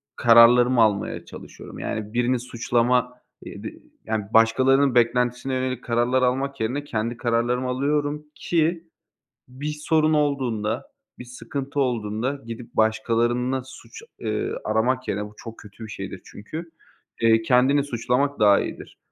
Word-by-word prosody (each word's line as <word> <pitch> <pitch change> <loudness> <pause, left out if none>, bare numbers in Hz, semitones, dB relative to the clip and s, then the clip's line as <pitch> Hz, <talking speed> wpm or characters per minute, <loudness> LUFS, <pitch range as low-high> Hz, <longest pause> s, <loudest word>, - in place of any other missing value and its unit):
kararlarımı 120 +1 +6
almaya 105 -2 0
çalışıyorum, - - -11
yani, 105 -1 -4
birini 125 +1 +1
suçlama, 125 +1 0 0.3
eee, - - -9
dı - - -4 0.4
yani, 110 -2 -2
başkalarının 130 +4 +4
beklentisine 125 +2 +1
yönelik 130 -1 -2
kararlar 120 +2 +1
almak 135 +2 0
yerine 130 +6 -1
kendi 115 -3 -3
kararlarımı 120 +2 0
alıyorum 145 +3 -1
ki 170 0 -1 0.6
bir 145 +4 -5
sorun 155 0 +2
olduğunda, 125 -6 -1 0.3
bir 125 - -8
sıkıntı 140 +3 -5
olduğunda 125 +2 -2
gidip 115 +1 -9
başkalarında 120 +3 +1
suç, 120 -3 -13 0.2
eee, 110 -1 -2
aramak 125 +4 0
yerine, 105 +1 -2
bu 105 - -14
çok 115 -1 -10
kötü 105 +2 -12
bir - - -9
şeydir 95 -2 -7
çünkü, 160 +11 -9 0.5
eee, 115 0 +4
kendini 130 +4 +3
suçlamak 125 +2 -1
daha 100 -2 +6
iyidir. - - -7
125 Hz, 130 wpm, -23 LUFS, 115-135 Hz, 0.6 s, kararlarımı